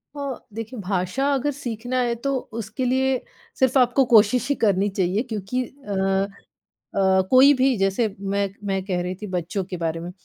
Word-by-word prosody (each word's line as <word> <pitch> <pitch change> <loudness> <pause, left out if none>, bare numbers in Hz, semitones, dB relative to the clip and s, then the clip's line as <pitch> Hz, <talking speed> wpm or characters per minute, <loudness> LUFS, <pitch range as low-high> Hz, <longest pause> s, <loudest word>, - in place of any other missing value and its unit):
अ, 280 -3 -4
देखिए 225 +2 -6
भाषा 190 +7 -1
अगर 280 +2 0
सीखना 250 -2 -3
है 240 -1 +1
तो 275 +4 -2 0.3
उसके 220 +5 -4
लिए 260 +1 +1 0.4
सिर्फ 260 0 +3
आपको 255 +1 +4
कोशिश 220 +4 +5
ही 285 - +2
करनी 200 0 +2
चाहिए 190 +2 0
क्योंकि 220 +4 -2
अ 195 -7 -1 0.7
अ, 190 -1 +3
कोई 265 +3 +8
भी 260 -1 +3
जैसे 195 +4 +1
मैं 200 0 -1 0.2
मैं 195 -1 -1
कह 185 -2 -1
रही 180 +1 -3
थी 210 - -5
बच्चों 185 +1 -2
के 180 0 -6
बारे 165 -1 -2
में, 170 +1 -6
210 Hz, 175 wpm, -23 LUFS, 190-255 Hz, 0.7 s, कोई